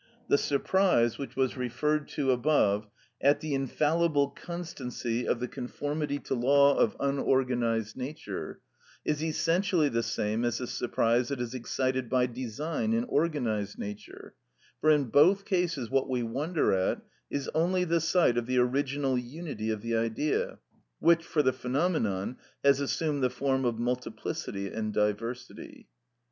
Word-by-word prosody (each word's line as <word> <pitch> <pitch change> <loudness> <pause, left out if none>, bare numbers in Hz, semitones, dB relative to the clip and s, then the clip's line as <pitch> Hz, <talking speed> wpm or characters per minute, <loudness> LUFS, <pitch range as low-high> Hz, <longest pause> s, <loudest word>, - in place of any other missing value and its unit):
The - - +5
surprise, 145 - +2
which 140 - -6
was 130 -1 +1
referred 140 +4 -1
to 135 -3 +2
above, 120 -6 +2 0.3
at 140 +2 +4
the 155 -2 -3
infallible 145 +2 +1
constancy 130 -9 -4
of 120 - +1
the 125 - -2
conformity 145 +4 -3
to - - -3
law 140 +3 +5
of - - +2
unorganised 125 -5 +1
nature, 140 +5 -6 0.4
is 150 0 0
essentially 165 0 +2
the 115 -2 0
same 110 0 -1
as 120 -1 0
the 125 - -3
surprise 120 0 +1
that 140 -1 -3
is 120 0 -3
excited 130 0 -1
by 125 -1 +3
design 130 - -3
in 230 +1 +1
organised 125 - -1
nature; 105 0 -8 0.5
for 155 - +3
in 150 -2 +5
both 190 +7 +5
cases 170 - -1
what 135 0 +1
we 125 -2 0
wonder 145 - 0
at 95 -1 0 0.3
is 140 -1 -3
only 180 +3 +2
the 170 -1 +1
sight 160 -7 +3
of 120 - -6
the 130 0 0
original 135 +1 +1
unity 125 -3 -5
of 110 -2 -2
the 115 0 -1
Idea, 115 +6 0 0.4
which, 170 0 +4
for 155 -2 +1
the 130 -1 +3
phenomenon, 125 - -1 0.3
has 140 -1 +5
assumed 145 +1 -1
the 125 - +4
form 130 +1 0
of 120 -2 0
multiplicity 120 -4 -3
and 110 +1 -3
diversity. 120 - -3
135 Hz, 150 wpm, -29 LUFS, 120-155 Hz, 0.5 s, The